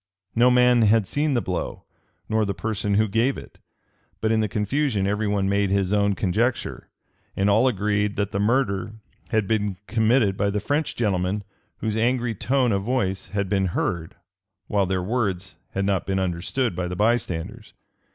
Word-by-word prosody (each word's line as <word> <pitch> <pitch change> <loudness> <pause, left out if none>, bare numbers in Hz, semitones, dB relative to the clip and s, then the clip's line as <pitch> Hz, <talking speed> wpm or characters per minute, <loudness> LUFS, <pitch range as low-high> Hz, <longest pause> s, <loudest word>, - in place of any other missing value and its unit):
No 120 +2 +5
man 125 -1 +5
had 110 -1 +4
seen 145 +7 0
the 120 - +2
blow, 90 -2 -4 0.4
nor 110 0 +1
the 100 -2 -2
person 105 +2 -1
who 110 +1 +3
gave 115 +6 +1
it, - - -12 0.6
but 110 - 0
in 110 - +3
the 110 - +1
confusion 105 +1 0
every 105 +2 0
one 100 -1 +1
made 100 0 +1
his 100 0 +1
own 100 -1 +2
conjecture; 110 +7 -1 0.5
and 100 +1 +3
all 110 +6 +4
agreed 105 -2 0
that 100 -1 -1
the 100 - -2
murder 105 -2 +1 0.4
had 110 -4 +1
been 105 -3 0
committed 110 -1 +2
by 100 0 +1
the 105 +1 -1
French 145 +8 -1
gentlemen 100 -2 0 0.4
whose 110 -2 -1
angry 120 +1 +1
tone 125 +3 +1
of 100 -1 +1
voice 100 -4 -1
had 100 -1 -2
been 95 -1 +1
heard, 85 -3 -2 0.5
while 100 -1 +1
their 95 -1 -1
words 95 -5 -2 0.2
had 100 0 -1
not 95 -3 0
been 95 0 0
understood 95 +5 -1
by 90 0 -2
the 90 - -4
bystanders. 105 -5 -1
105 Hz, 175 wpm, -24 LUFS, 95-115 Hz, 0.6 s, No